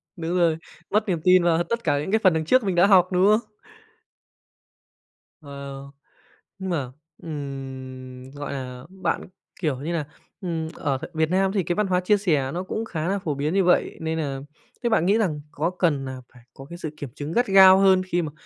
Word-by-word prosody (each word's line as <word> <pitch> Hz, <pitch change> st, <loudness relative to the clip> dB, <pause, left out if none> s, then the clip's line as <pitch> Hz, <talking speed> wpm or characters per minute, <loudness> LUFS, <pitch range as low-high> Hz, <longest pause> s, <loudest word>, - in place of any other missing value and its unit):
đúng 170 Hz, 0 st, -3 dB
rồi, 165 Hz, -2 st, +3 dB, 0.3 s
mất 210 Hz, +1 st, +1 dB
niềm 170 Hz, -3 st, 0 dB
tin 185 Hz, -1 st, +5 dB
vào 170 Hz, 0 st, +3 dB
tất 235 Hz, +5 st, -3 dB
cả 145 Hz, -, +1 dB
những 150 Hz, +6 st, -4 dB
cái 220 Hz, -, +3 dB
phần 185 Hz, -, +6 dB
đằng 160 Hz, -1 st, -1 dB
trước 255 Hz, +7 st, +4 dB
mình 190 Hz, -3 st, -1 dB
đã 175 Hz, +2 st, +6 dB
học, 185 Hz, -3 st, +6 dB
đúng 180 Hz, +1 st, +3 dB
không? 215 Hz, +1 st, +2 dB, 1.9 s
Wow. 140 Hz, -1 st, -8 dB, 0.7 s
Nhưng 190 Hz, -, -4 dB
mà, 140 Hz, -8 st, -2 dB, 0.3 s
ừm, 130 Hz, -3 st, -7 dB
gọi 145 Hz, 0 st, -6 dB
là, 125 Hz, -1 st, -7 dB
bạn, 190 Hz, -1 st, -2 dB, 0.4 s
kiểu 150 Hz, -7 st, -1 dB
như 160 Hz, +5 st, -3 dB
là, 160 Hz, -3 st, -1 dB, 0.4 s
ừm, 165 Hz, -4 st, -3 dB
ở 140 Hz, -2 st, -1 dB, 0.2 s
Việt 160 Hz, -1 st, +1 dB
Nam 190 Hz, +1 st, +2 dB
thì 195 Hz, -2 st, 0 dB
cái 175 Hz, -, -1 dB
văn 210 Hz, 0 st, +1 dB
hóa 180 Hz, -1 st, +2 dB
chia 205 Hz, +3 st, +3 dB
sẻ 150 Hz, -9 st, 0 dB
nó 175 Hz, +3 st, -3 dB
cũng 220 Hz, +4 st, -4 dB
khá 160 Hz, -6 st, -3 dB
là 200 Hz, -, 0 dB
phổ 155 Hz, -6 st, -3 dB
biến 145 Hz, +4 st, -1 dB
như 195 Hz, 0 st, +3 dB
vậy 180 Hz, 0 st, +2 dB
nên 160 Hz, 0 st, -2 dB
là 140 Hz, -3 st, -3 dB, 0.4 s
thế 240 Hz, -, +2 dB
bạn 220 Hz, -7 st, +2 dB
nghĩ 200 Hz, +4 st, +4 dB
rằng 160 Hz, -9 st, 0 dB
có 160 Hz, +4 st, -1 dB
cần 165 Hz, -7 st, 0 dB
nà 130 Hz, 0 st, -6 dB, 0.2 s
phải 125 Hz, -, -17 dB
có 135 Hz, -, -11 dB
cái 170 Hz, +3 st, -9 dB
sự 160 Hz, -, -5 dB
kiểm 145 Hz, -4 st, -6 dB
chứng 145 Hz, +2 st, -5 dB
gắt 240 Hz, +6 st, +1 dB
gao 190 Hz, -1 st, +8 dB
hơn 190 Hz, -1 st, +5 dB
khi 175 Hz, -1 st, 0 dB
mà, 155 Hz, -3 st, -4 dB
165 Hz, 215 wpm, -24 LUFS, 145-190 Hz, 1.9 s, gao